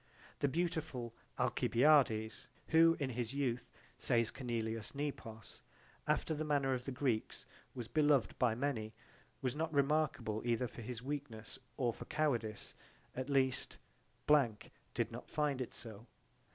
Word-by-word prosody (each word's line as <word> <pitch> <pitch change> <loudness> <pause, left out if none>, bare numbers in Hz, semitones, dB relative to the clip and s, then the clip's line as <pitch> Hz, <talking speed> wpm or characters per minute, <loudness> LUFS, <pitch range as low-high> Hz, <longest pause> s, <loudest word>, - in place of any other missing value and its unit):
T 145 - +3
he - - -2
beautiful 155 -8 -2 0.2
Alcibiades, 115 -5 +3 0.2
who 165 0 +6
in 135 -3 -1
his 120 +1 -3
youth, 125 -4 -1 0.3
says 115 -2 +2
Cornelius 115 -3 -3
Nepos, 130 -6 -5 0.5
after - - +1
the 155 0 -2
manner 140 -3 +2
of 125 -1 -3
the 135 - -3
Greeks, 125 -4 -1 0.3
was 120 -3 -5
beloved 145 -4 +3
by 120 -3 +3
many, 115 -4 -2 0.5
was 130 0 0
not 160 +1 -1
remarkable 140 -7 +1
either 120 +1 +1
for 120 - -10 0.2
weakness 135 -6 -5 0.2
or 120 -3 +1
for - - -9
cowardice: 120 -9 -1 0.4
at 130 +2 -3
least, 135 -2 +2 0.5
[blank] 135 -8 +3 0.2
did - - 0
not - - -8
find 145 -3 0
it 125 - -3
so. 115 -1 -9
130 Hz, 140 wpm, -36 LUFS, 115-145 Hz, 0.5 s, who